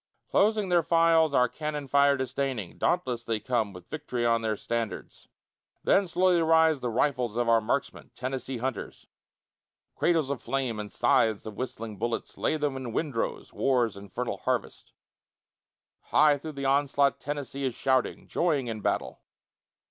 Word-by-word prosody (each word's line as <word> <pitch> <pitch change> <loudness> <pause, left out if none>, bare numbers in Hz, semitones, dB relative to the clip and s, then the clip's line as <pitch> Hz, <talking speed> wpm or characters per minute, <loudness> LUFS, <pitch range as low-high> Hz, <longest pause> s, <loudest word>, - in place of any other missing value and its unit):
Closing 210 -1 +2
their 175 -1 +4
files, 165 -1 +4
our 125 0 +5
cannon 150 +1 -5
fire 140 +1 +4
disdaining, 130 -6 -3
Dauntless 125 -9 0
they 115 -2 -1
come 115 -3 -1
with 90 -2 -12
vict'ry 125 -6 -3
on 115 -1 +3
their 110 -2 -1
standards; 115 -5 -4 0.6
Then 195 -1 +3
slowly 180 0 +3
rise 160 -2 +4
the 125 - -2
rifles 125 -1 0
of 120 0 0
our 115 -1 +4
marksmen, 140 +6 -2
Tennessee 130 0 -4
hunters. 130 +2 -5 0.9
Cradles 160 -5 +1
of 140 - -3
flame 125 -3 -2
and 105 -1 -6
scythes 110 -3 +2
of 110 - -6
whistling 115 -4 -5
bullets 115 +1 -3
Lay 155 - +1
them 145 -3 -1
in 130 -4 -5
windrows, 140 -6 -3
war's 125 -6 +1
infernal 100 +5 -5
harvest. - - -3 1.1
High 150 -2 +4
through 155 +2 -7
the 140 -1 -5
onslaught 140 0 +2
Tennessee 140 -1 -5
is 130 -3 -2
shouting, 130 -1 0
Joying 155 -7 +1
in 110 -3 -5
battle. - - -2
130 Hz, 150 wpm, -28 LUFS, 115-150 Hz, 1.1 s, our